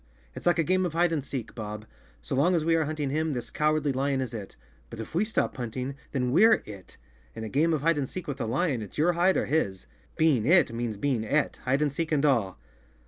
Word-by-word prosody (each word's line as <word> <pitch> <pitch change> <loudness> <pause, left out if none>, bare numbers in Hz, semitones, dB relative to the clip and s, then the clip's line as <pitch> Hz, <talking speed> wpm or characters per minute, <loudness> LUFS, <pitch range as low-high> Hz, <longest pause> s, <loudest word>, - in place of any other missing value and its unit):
It's - - -5
like 175 - +4
a 165 - +3
game 185 +3 +2
of 175 -3 -2
hide 170 +1 +2
and 155 -4 -1
seek, 130 -4 -5
Bob. 105 -1 -6 0.4
So - - -5
long 170 +7 +3
as 160 -2 0
we 165 - +3
are 160 -1 +2
hunting 150 -2 -3
him, 155 +1 0
this 120 -2 -5
Cowardly 150 -1 +1
Lion 135 +1 0
is 130 -3 -3
it. 105 -4 -7 0.3
But - - -9
if 110 - -7
we 175 +5 +2
stop 215 +1 -1
hunting, 125 +2 -4 0.2
then 125 -3 -1
we're 215 - +5
it. 100 -3 -11 0.4
In 110 - -6
a 110 - -5
game 155 +8 +2
of 155 -3 0
hide 165 -1 +3
and 135 - -2
seek 185 - -7
with 140 -2 -4
a 115 - -1
lion, 135 0 0
it's 105 - -9
your 170 +4 +3
hide 180 +2 +3
or - - 0
his. 100 -12 -1 0.3
Being 155 -8 +3
it, 175 -7 +5
means 115 -2 -3
being 125 -1 0
et, 140 +7 0
hide 135 +4 +2
and 145 -2 0
seek 165 +2 -3
and 150 -1 +2
all!" 115 -10 +1
140 Hz, 250 wpm, -27 LUFS, 120-160 Hz, 0.4 s, we're